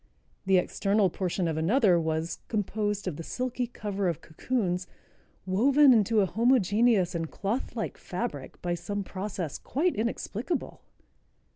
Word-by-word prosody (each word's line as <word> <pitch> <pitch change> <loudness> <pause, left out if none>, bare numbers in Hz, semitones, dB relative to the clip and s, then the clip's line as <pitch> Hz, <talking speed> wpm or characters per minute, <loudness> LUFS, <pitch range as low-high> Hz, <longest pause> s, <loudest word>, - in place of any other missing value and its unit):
The 190 -1 +5
external 195 +1 +2
portion 180 -1 -1
of 160 -1 -1
another 185 +2 +4
was 160 0 -2
"composed 210 -1 -1
of 165 -5 -3
the 165 - -6
silky 250 +4 -2
cover 200 -4 -3
of 165 -3 -1
cocoons, 180 +1 -2 0.6
woven 265 +9 +5
into 220 -1 +3
a - - +3
homogeneous 220 -3 +3
and 165 -2 -3
clothlike 210 +7 -3
fabric, - - -5
by 175 -1 0
some 205 +4 -3
process 190 -5 -5
quite 335 +6 0
inexplicable." 230 - -3
200 Hz, 130 wpm, -28 LUFS, 180-230 Hz, 0.6 s, The